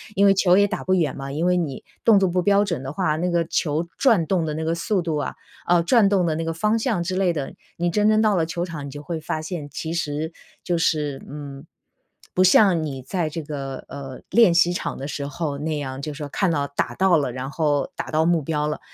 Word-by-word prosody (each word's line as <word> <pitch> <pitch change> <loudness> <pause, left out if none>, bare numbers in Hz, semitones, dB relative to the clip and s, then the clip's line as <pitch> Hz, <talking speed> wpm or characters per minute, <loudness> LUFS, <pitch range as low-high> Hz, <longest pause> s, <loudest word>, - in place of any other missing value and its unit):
因 200 - +4
为 195 - +7
球 185 -1 +4
也 205 - +5
打 - - -4
不 185 - +2
远 160 -7 0
嘛。 135 0 -6
因 155 +4 -1
为 180 0 +3
你 155 -6 -3 0.2
动 220 -3 +6
作 190 - +3
不 180 +1 +1
标 200 +2 +3
准 170 -9 -3
的 135 - -5
话， 155 -1 0
那 180 +3 0
个 170 -1 +1
球 160 +1 -1
转 220 -11 +4
动 170 -2 0
的 150 - -3
那 160 - -3
个 165 +1 0
速 185 +4 0
度 160 -2 -1
啊， 145 - -3 0.3
呃， 175 -1 +4
转 210 +2 +4
动 195 -3 +2
的 165 - +1
那 165 +1 -2
个 165 - -2
方 210 +6 +1
向 220 -7 0
之 185 +2 -3
类 185 -2 +2
的， 145 -5 -4 0.2
你 175 0 0
真 210 +3 +3
正 215 0 +4
到 215 -2 +3
了 165 -3 +1
球 170 +1 -2
场 160 -5 -7
你 - - -7
就 145 +2 -9
会 165 0 -4
发 155 0 -3
现， 155 -3 -5
其 160 +3 -5
实 160 0 -2 0.3
就 175 -1 0
是， 150 -4 0
嗯， 140 0 -8 0.7
不 185 - +3
像 185 -3 +5
你 135 -4 -5
在 165 +4 -2
这 165 +2 -5
个， 140 -3 -6
呃， 135 -2 -8
练 225 -6 +5
习 170 +1 +4
场 175 - -3
的 135 - -5
时 145 -1 -4
候 145 0 -3
那 155 +1 -2
样， 135 -2 -5
就 150 +1 -4
说 145 0 -6
看 185 +5 0
到 145 -3 0
打 140 - -2
到 190 -3 +4
了， 140 -5 -1
然 130 +2 -5
后 145 -2 0
打 - - -5
到 160 +1 +2
目 170 -1 +3
标 150 0 -1
了。 150 - -3
165 Hz, 275 characters per minute, -23 LUFS, 145-180 Hz, 0.7 s, 为